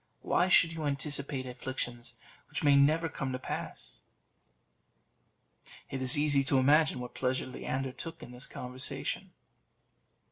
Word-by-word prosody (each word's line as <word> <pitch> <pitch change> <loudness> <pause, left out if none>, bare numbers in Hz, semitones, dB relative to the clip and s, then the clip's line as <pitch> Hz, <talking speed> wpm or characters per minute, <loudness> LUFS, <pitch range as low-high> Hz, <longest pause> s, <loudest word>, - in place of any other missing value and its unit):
Why 180 - +2
should 165 -2 +5
you 160 -2 -4
anticipate 140 -1 -1
afflictions 125 -1 -4 0.3
which - - -3
may 145 -1 +6
never 155 +4 +4
come 135 -4 -4
to - - -1
pass?" - - -6 1.9
It 135 - -3
is 130 +3 +6
easy 145 -2 +3
to 135 0 +3
imagine 150 +3 +4
what 125 0 -7
pleasure 130 0 -1
Leander 130 +1 -3
took 165 +5 -7
in 125 - -10
this 125 +1 -5
conversation. 125 +1 -4
135 Hz, 135 wpm, -31 LUFS, 130-150 Hz, 1.9 s, may